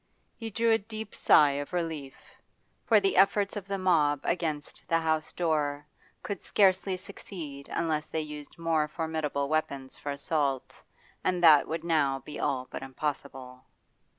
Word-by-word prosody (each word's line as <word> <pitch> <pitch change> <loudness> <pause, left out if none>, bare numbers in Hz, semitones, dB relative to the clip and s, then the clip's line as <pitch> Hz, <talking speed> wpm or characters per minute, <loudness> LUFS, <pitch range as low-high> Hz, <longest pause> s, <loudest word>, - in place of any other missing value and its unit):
He 225 -1 -6
drew 230 +2 +2
a 225 - +4
deep 215 +1 -7
sigh 145 -2 +5
of 145 +4 -6
relief, 160 -6 -3 0.7
for 220 -2 +5
the 195 -1 +1
efforts 200 +2 +3
of 200 -2 -6
the 200 0 -2
mob 160 -6 +3
against 155 -4 -2
the 165 -3 +3
house 160 -1 0
door 150 -4 -1 0.4
could 200 -3 -4
scarcely 190 -1 +2
succeed 160 -7 -8
unless 155 -2 -1
they 160 - -2
used 150 -1 -8
more 165 -2 +1
formidable 155 -3 -2
weapons 140 -3 -2
for 145 - -4
assault, 140 -2 -2 0.4
and 180 -1 0
that 155 -4 +7
would 160 +1 -3
now 150 -5 +2
be 140 +3 -9
all 130 -3 -1
but - - -5
impossible. 135 -2 -5
155 Hz, 150 wpm, -29 LUFS, 145-185 Hz, 0.7 s, that